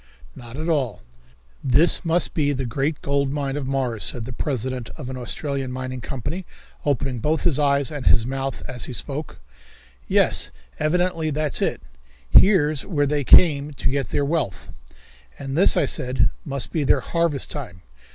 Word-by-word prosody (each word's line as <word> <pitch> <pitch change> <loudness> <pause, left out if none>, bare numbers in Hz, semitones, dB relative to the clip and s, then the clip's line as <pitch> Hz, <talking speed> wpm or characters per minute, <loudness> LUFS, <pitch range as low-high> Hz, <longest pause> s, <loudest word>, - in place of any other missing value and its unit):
"Not 120 -1 -10
at 155 +2 -4
all." 130 - -1 0.6
"This 155 +9 +4
must 170 0 +1
be 145 -2 +1
the 135 -1 -3
great 140 +6 -2
gold 140 -1 0
mine 140 -1 -2
of 145 -3 -3
Mars," 130 -5 -1
said 120 -2 +4
the 125 - -7
president 130 -2 -3
of 130 -5 -6
an - - -6
Australian 135 +2 -4
mining 130 0 -5
company, 145 +9 -5 0.4
opening 135 -3 -1
both 155 +7 0
his 165 -6 +2
eyes 140 -2 +3
and 145 -3 -4
his 115 - +5
mouth 135 +1 -4
as 125 -3 -2
he 130 - -6
spoke. 145 +4 -5 0.7
"Yes, - - +2 0.3
evidently 165 0 0
that's 150 0 +1
it. - - -1 0.4
Here's 155 -8 +5
where 155 -7 0
they 145 0 0
come 145 0 +5
to 130 - -1
get 140 -1 -1
their 145 - 0
wealth." 140 - -2 0.7
"And 135 -1 -5
this," 180 - +4
I - - +3
said, 130 -1 0
"must 140 -4 -3
be 155 - -1
their 140 - +3
harvest 165 -5 -1
time. 110 -11 -6
140 Hz, 170 wpm, -23 LUFS, 130-150 Hz, 0.7 s, his